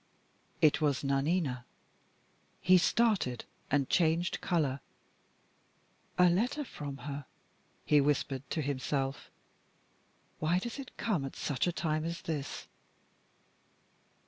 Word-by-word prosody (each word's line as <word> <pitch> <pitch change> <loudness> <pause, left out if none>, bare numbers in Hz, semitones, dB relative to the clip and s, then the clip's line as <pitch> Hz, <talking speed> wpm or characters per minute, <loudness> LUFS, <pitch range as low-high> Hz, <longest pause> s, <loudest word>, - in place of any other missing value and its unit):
It 155 -1 +5
was 145 -3 +1
"NANINA." 140 -1 +1 1.0
He 185 0 +6
started, 195 - +2 0.2
and 140 -1 +2
changed 170 +1 +2
color. 150 -7 +1 1.4
"A 180 - +7
letter 230 - +1
from 145 - -6
her," 140 -1 -5 0.6
he 150 -1 +5
whispered 140 -2 +1
to 155 - -1
himself. 135 0 -2 1.1
"Why 160 +3 +2
does 235 +8 -4
it 265 - -9
come 200 -11 0
at 135 - -5
such 145 +2 -1
a - - +2
time 155 -2 -1
as 170 +1 -4
this?" 145 -4 -4
155 Hz, 110 wpm, -32 LUFS, 140-175 Hz, 1.4 s, A